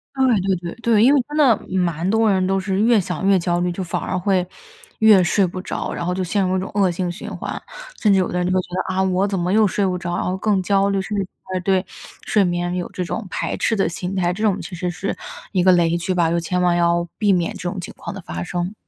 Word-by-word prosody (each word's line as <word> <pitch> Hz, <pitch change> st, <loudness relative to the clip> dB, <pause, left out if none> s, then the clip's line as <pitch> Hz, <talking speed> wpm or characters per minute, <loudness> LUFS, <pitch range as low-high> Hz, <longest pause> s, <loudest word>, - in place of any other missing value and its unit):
对 265 Hz, -1 st, +2 dB, 0.2 s
对 190 Hz, 0 st, +1 dB
对， 170 Hz, 0 st, -7 dB
对， 225 Hz, -2 st, +4 dB
因 265 Hz, +4 st, +6 dB
为 285 Hz, -, +4 dB
真 295 Hz, -, -4 dB
的 270 Hz, -7 st, +5 dB, 0.2 s
蛮 170 Hz, -2 st, 0 dB
多 220 Hz, +1 st, +3 dB
人 190 Hz, -1 st, +2 dB
都 195 Hz, 0 st, +1 dB
是 190 Hz, 0 st, -1 dB
越 230 Hz, 0 st, +4 dB
想 180 Hz, 0 st, -3 dB
越 195 Hz, -1 st, +5 dB
焦 175 Hz, 0 st, 0 dB
虑， 180 Hz, 0 st, 0 dB
就 185 Hz, +2 st, -4 dB
反 175 Hz, -, -3 dB
而 -, -, -2 dB
会 185 Hz, 0 st, +1 dB, 0.5 s
越 215 Hz, -4 st, +6 dB
睡 190 Hz, +3 st, +3 dB
不 185 Hz, +1 st, -5 dB
着， -, -, -4 dB
然 -, -, -4 dB
后 180 Hz, -, 0 dB
就 185 Hz, +1 st, -2 dB
陷 195 Hz, +3 st, 0 dB
入 185 Hz, +1 st, +1 dB
一 -, -, 0 dB
种 190 Hz, -, -5 dB
恶 200 Hz, -2 st, +3 dB
性 175 Hz, 0 st, -2 dB
循 175 Hz, -, -8 dB
环。 -, -, -5 dB, 0.4 s
甚 210 Hz, -, +4 dB
至 195 Hz, -, +4 dB
有 185 Hz, -, +1 dB
的 180 Hz, -, -3 dB
人 180 Hz, -, 0 dB
就 -, -, 0 dB
会 185 Hz, -, +3 dB
觉 -, -, -14 dB, 0.2 s
得， 185 Hz, -, -2 dB
啊， 190 Hz, -, +2 dB
我 190 Hz, +1 st, +1 dB
怎 195 Hz, -1 st, -2 dB
么 175 Hz, 0 st, -1 dB
又 215 Hz, 0 st, +5 dB
睡 200 Hz, +1 st, 0 dB
不 185 Hz, -1 st, 0 dB
着， 175 Hz, 0 st, -3 dB
然 -, -, -1 dB
后 180 Hz, -, -1 dB
更 200 Hz, 0 st, +1 dB
焦 195 Hz, +1 st, +2 dB
虑， 200 Hz, -1 st, 0 dB
甚 210 Hz, +2 st, -4 dB
至 200 Hz, -, +1 dB, 0.2 s
反 185 Hz, -, -6 dB
而 185 Hz, -, -1 dB
对 190 Hz, 0 st, +1 dB, 0.4 s
睡 210 Hz, -, +3 dB
眠 175 Hz, 0 st, -1 dB
有 180 Hz, -1 st, -3 dB
这 180 Hz, -, -3 dB
种 185 Hz, -, -4 dB
排 -, -, -2 dB
斥 225 Hz, -, +1 dB
的 195 Hz, -, +1 dB
心 180 Hz, +3 st, -4 dB
态。 175 Hz, -2 st, +1 dB
这 215 Hz, +4 st, -5 dB
种 205 Hz, -3 st, +2 dB
其 185 Hz, -, -7 dB
实 180 Hz, 0 st, -2 dB
是 180 Hz, +3 st, -3 dB, 0.4 s
一 185 Hz, -, +1 dB
个 185 Hz, -, +6 dB
雷 170 Hz, -2 st, +3 dB
区 185 Hz, +2 st, -2 dB
吧， 170 Hz, -2 st, +2 dB
就 170 Hz, -, +1 dB
千 180 Hz, +2 st, -2 dB
万 175 Hz, -1 st, +3 dB
要 170 Hz, 0 st, +2 dB
避 210 Hz, -2 st, +3 dB
免 175 Hz, -3 st, +1 dB
这 175 Hz, -, -4 dB
种 190 Hz, -, -5 dB
情 175 Hz, -, -7 dB
况 -, -, -7 dB
的 -, -, -7 dB
发 85 Hz, +1 st, -6 dB
生。 175 Hz, -, -3 dB
185 Hz, 310 characters per minute, -21 LUFS, 175-200 Hz, 0.5 s, 因